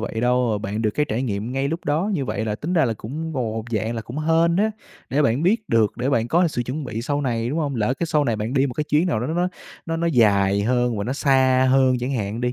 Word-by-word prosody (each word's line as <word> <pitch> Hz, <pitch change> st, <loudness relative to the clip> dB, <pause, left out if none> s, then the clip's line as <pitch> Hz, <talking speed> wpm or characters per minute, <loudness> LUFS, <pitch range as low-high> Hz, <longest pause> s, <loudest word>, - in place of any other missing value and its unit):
vậy 110 Hz, 0 st, -3 dB
đâu, 125 Hz, -3 st, +1 dB
bạn 105 Hz, +2 st, -3 dB
được 110 Hz, -, +2 dB
cái 150 Hz, +6 st, -1 dB
trải 115 Hz, +4 st, -1 dB
nghiệm 110 Hz, 0 st, -3 dB
ngay 135 Hz, +1 st, -1 dB
lúc 165 Hz, +3 st, -4 dB
đó 160 Hz, +8 st, 0 dB
như 145 Hz, -7 st, -1 dB
vậy 105 Hz, -1 st, -3 dB
là 105 Hz, -1 st, -2 dB
tính 160 Hz, +10 st, -4 dB
ra 160 Hz, -5 st, +3 dB
là 115 Hz, -2 st, 0 dB
cũng 155 Hz, +10 st, -6 dB
gồ 135 Hz, -, -2 dB
một 110 Hz, 0 st, -3 dB
dạng 110 Hz, +1 st, -1 dB
là 115 Hz, -, -4 dB
cũng 125 Hz, +6 st, -7 dB
hên 165 Hz, +2 st, +2 dB
á, 215 Hz, +2 st, +2 dB, 0.4 s
để 145 Hz, +3 st, +2 dB
bạn 125 Hz, +4 st, +1 dB
biết 215 Hz, +4 st, +1 dB
được, 115 Hz, -2 st, +2 dB
để 125 Hz, +3 st, -1 dB
bạn 115 Hz, -2 st, +1 dB
có 170 Hz, +3 st, +3 dB
sự 120 Hz, -5 st, -2 dB
chuẩn 135 Hz, +5 st, -4 dB
bị 115 Hz, -2 st, -4 dB
sau 145 Hz, +2 st, -1 dB
này, 120 Hz, -3 st, -1 dB
đúng 155 Hz, +5 st, -2 dB
hông? 145 Hz, -4 st, -1 dB
Lỡ 115 Hz, +4 st, +1 dB
cái 170 Hz, -, -3 dB
sau 150 Hz, -2 st, +1 dB
này 115 Hz, -4 st, 0 dB
bạn 110 Hz, +5 st, -3 dB
đi 135 Hz, +1 st, +3 dB
một 125 Hz, -, -5 dB
cái 150 Hz, -, -1 dB
chuyến 155 Hz, +4 st, +2 dB
nào 125 Hz, -11 st, 0 dB
đó 125 Hz, -, -2 dB
nó 160 Hz, -, -2 dB
nó 180 Hz, +1 st, +1 dB, 0.4 s
nó 165 Hz, -, -2 dB
nó 170 Hz, +1 st, -1 dB
dài 100 Hz, -7 st, +3 dB
hơn 120 Hz, -1 st, +1 dB
và 100 Hz, -, -2 dB
nó 125 Hz, -, -2 dB
xa 130 Hz, -2 st, +3 dB
hơn 130 Hz, -1 st, +4 dB
chẳng 125 Hz, +3 st, -3 dB
hạn 110 Hz, -1 st, -3 dB
đi, 125 Hz, 0 st, 0 dB
130 Hz, 295 wpm, -22 LUFS, 115-150 Hz, 0.4 s, hơn